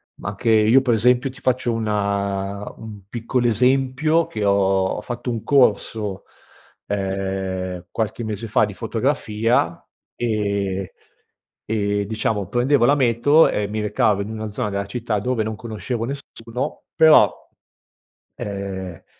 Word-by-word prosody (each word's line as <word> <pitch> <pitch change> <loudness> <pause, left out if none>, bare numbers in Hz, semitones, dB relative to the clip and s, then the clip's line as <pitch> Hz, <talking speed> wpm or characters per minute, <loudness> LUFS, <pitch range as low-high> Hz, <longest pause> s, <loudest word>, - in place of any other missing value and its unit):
ma 100 - -5
anche 105 +4 -2
io 110 +4 +5
per 125 -3 +1
esempio 125 +4 +3
ti 130 - -13
faccio 125 -2 +1
una 100 -2 -1
un 110 -2 -9
piccolo 120 +1 -1
esempio 135 +7 +2
che 105 -2 -3
ho 95 -1 +2
fatto 120 0 -5
un 115 -3 -3
corso, 110 -6 +1 0.6
ehm, 95 -2 -3
qualche 110 +1 -2
mese 110 +1 -4
fa 110 - +3
di 100 - -7
fotografia 115 - 0 0.3
e 100 -5 -1 0.8
e 100 -2 0
diciamo 110 -2 -1
prendevo 125 +1 +2
la 145 - +5
metro 140 +4 +4
e 105 -1 -1
mi 110 +1 -3
recavo 105 -1 +1
in 105 - -6
una 110 0 -5
zona 105 0 -3
della 100 0 -2
città 115 0 -2
dove 125 +1 0
non 110 0 -4
conoscevo 115 +1 -4
nessuno, 125 -1 -5
però, 160 -1 +5 0.9
ehm 95 -3 -6
110 Hz, 130 wpm, -22 LUFS, 100-120 Hz, 0.9 s, io